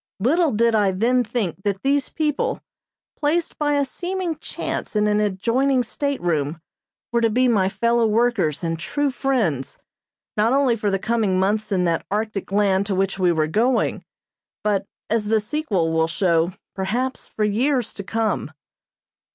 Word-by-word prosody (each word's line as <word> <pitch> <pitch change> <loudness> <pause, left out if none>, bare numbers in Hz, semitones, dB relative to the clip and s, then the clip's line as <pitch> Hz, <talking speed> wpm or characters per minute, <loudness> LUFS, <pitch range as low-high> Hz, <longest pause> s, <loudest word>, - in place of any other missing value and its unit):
Little 305 - +3
did 230 +1 +2
I 205 -3 +3
then 245 +6 +2
think 210 -6 -3
that 195 -1 -2
these 275 0 +1
people, 315 - -1 0.6
placed 320 +3 -1
by 295 -1 +1
a 285 -1 +2
seeming 355 +3 -3
chance - - -4
in 210 0 +3
an 210 0 +2
adjoining 235 +6 +1
stateroom, 175 - -2 0.5
were 235 0 +2
to 230 - +3
be 250 +4 +3
my 200 -6 +3
fellow 235 +3 +2
workers 215 - +1
and 165 -1 -2
true 290 - -1
friends, 225 - -1 0.6
not 220 +4 +2
only 270 -3 +3
for 210 -2 -1
the 195 - +1
coming 210 -3 0
months 210 +3 0
in 185 -2 +2
that 170 -2 0
Arctic 210 -1 -2
land 200 -1 +2
to 195 - -1
which 195 +1 0
we 180 -2 +3
were 160 -2 +1
going, 230 +11 +1 0.6
but, 200 -2 0 0.2
as 225 -1 0
the 220 +1 +2
sequel 210 - -1
will 160 0 +2
show, 170 0 +1 0.2
perhaps 235 +7 -2
for 215 - -3
years 245 +4 +1
to 200 - -6
come. 220 -6 -1
215 Hz, 160 wpm, -22 LUFS, 190-255 Hz, 0.6 s, Little